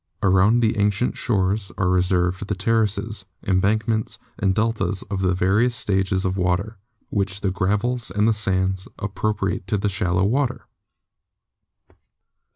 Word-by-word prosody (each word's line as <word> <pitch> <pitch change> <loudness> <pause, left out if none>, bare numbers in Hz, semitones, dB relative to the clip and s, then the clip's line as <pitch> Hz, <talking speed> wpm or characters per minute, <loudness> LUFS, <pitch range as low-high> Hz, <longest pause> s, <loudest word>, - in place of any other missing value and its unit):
Around 100 +5 +4
the 110 -2 +1
ancient 105 +4 +1
shores 100 -2 0
are 90 - +1
reserved 90 +1 +1
the 105 - -1
terraces, 110 0 0 0.2
embank 100 +4 +1
ments 110 -1 -1 0.2
and 95 -1 +1
deltas 105 -4 0
of 95 -1 -1
the 90 -1 +2
various 105 +7 +2
stages 95 -2 0
of 95 +1 -1
water, 95 +4 -1 0.3
with 100 -1 -1
the 95 - 0
gravels 105 +5 0
and 105 +4 +2
sands 95 -2 0
appropriate 100 -1 -2
to 105 - 0
the 100 +1 0
shallow 95 -1 0
water. 130 +5 0
100 Hz, 135 wpm, -22 LUFS, 95-110 Hz, 0.3 s, Around